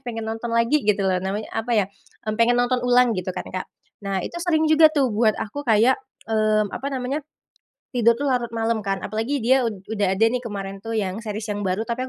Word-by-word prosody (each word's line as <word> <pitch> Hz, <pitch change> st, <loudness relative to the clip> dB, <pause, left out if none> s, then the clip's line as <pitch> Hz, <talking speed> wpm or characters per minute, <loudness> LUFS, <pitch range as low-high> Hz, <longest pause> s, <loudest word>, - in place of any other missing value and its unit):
pengen 225 Hz, -3 st, -5 dB
nonton 225 Hz, +1 st, -4 dB
lagi, 230 Hz, +6 st, +2 dB
gitu 205 Hz, -1 st, +2 dB
loh. 185 Hz, -1 st, +1 dB
Namanya 200 Hz, +3 st, -3 dB
apa 225 Hz, +2 st, -3 dB
ya, 200 Hz, -, +3 dB, 0.5 s
pengen 235 Hz, +2 st, +3 dB
nonton 245 Hz, 0 st, +1 dB
ulang 245 Hz, -2 st, +4 dB
gitu 185 Hz, 0 st, -3 dB
kan, -, -, -6 dB
Kak. 185 Hz, 0 st, -5 dB, 0.3 s
Nah, 195 Hz, -1 st, -1 dB
itu -, -, -10 dB
sering 320 Hz, -3 st, +2 dB
juga 315 Hz, 0 st, +6 dB
tuh 285 Hz, -4 st, +2 dB
buat 215 Hz, -1 st, +2 dB
aku 285 Hz, +7 st, -4 dB
kayak 235 Hz, 0 st, +4 dB, 0.3 s
eee, 215 Hz, -1 st, +2 dB
apa 270 Hz, +7 st, -5 dB
namanya, 270 Hz, +3 st, -2 dB, 0.7 s
tidur 235 Hz, -1 st, +4 dB
tuh 285 Hz, -, -3 dB
larut 250 Hz, -4 st, +1 dB
malam 225 Hz, 0 st, 0 dB
kan 195 Hz, -1 st, -3 dB
apalagi 225 Hz, +7 st, -2 dB
dia 255 Hz, 0 st, +4 dB
ud 195 Hz, -4 st, -8 dB
udah 200 Hz, -3 st, 0 dB
ada 220 Hz, -, +4 dB
nih 250 Hz, -, 0 dB
kemarin 195 Hz, -4 st, -6 dB
tuh 225 Hz, +2 st, -4 dB
yang 200 Hz, 0 st, -2 dB
series 215 Hz, -1 st, -5 dB
yang 205 Hz, -, -4 dB
baru 195 Hz, +2 st, -1 dB
tapi 250 Hz, +2 st, -3 dB
225 Hz, 215 wpm, -23 LUFS, 205-250 Hz, 0.7 s, juga